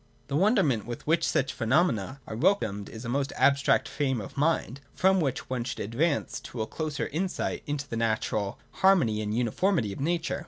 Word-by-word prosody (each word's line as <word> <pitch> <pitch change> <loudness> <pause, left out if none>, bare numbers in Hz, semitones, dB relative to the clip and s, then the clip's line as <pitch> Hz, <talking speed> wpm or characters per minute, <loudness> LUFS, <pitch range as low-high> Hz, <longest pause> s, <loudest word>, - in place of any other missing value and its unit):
The 140 - -1
wonder 200 +5 +4
ment 115 -7 0
with 120 - -6
which 165 +2 +2
such 135 0 0
phenomena 130 - +1
are 110 - -6
welcomed 110 - +1
is 115 +2 -9
a - - -4
most 135 +3 -1
abstract 140 0 +3
frame 130 -4 -1
of 100 - -8
mind, 140 -3 0
from 190 +1 +4
which 135 -4 -2
one 125 -2 -2
should 130 - -5
advance 140 +9 -1
to 115 -3 -5
a - - -3
closer 155 +5 -3
insight 180 +5 -2
into 145 -1 -3
the 115 - -4
inner 115 -1 +2 0.5
harmony 135 - +3
and 105 -1 -3
uniformity 125 - +1
of - - -9
nature. 165 +3 -1
135 Hz, 190 wpm, -28 LUFS, 115-165 Hz, 0.5 s, wonder